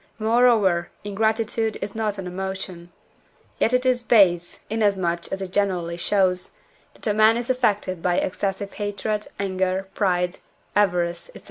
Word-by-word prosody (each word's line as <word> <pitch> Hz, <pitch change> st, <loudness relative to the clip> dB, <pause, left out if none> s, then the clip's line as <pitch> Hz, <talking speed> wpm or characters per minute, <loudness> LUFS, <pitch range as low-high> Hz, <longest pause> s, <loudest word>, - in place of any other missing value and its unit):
Moreover, 220 Hz, -6 st, +3 dB
ingratitude 220 Hz, +2 st, 0 dB
is 200 Hz, 0 st, -5 dB
not 215 Hz, -2 st, -2 dB
an 190 Hz, -, -5 dB
emotion. 185 Hz, -1 st, -5 dB, 0.7 s
Yet 225 Hz, -, +3 dB
it 250 Hz, +1 st, +2 dB
is 250 Hz, -1 st, +2 dB
base, 185 Hz, -7 st, +3 dB
inasmuch 195 Hz, -6 st, 0 dB
as 195 Hz, 0 st, -3 dB
it 185 Hz, -, -7 dB
generally 180 Hz, -4 st, 0 dB
shows, 180 Hz, 0 st, +1 dB, 0.4 s
that -, -, -15 dB
a 210 Hz, -, +2 dB
man 215 Hz, +2 st, +5 dB
is 240 Hz, +1 st, -1 dB
affected 210 Hz, -8 st, 0 dB
by 175 Hz, 0 st, +1 dB
excessive 195 Hz, +1 st, -2 dB
hatred, 210 Hz, +1 st, -3 dB
anger, 190 Hz, 0 st, -1 dB
pride, 180 Hz, -3 st, 0 dB, 0.4 s
avarice, 175 Hz, -, +1 dB
&c. -, -, -9 dB
195 Hz, 140 wpm, -23 LUFS, 180-220 Hz, 0.7 s, man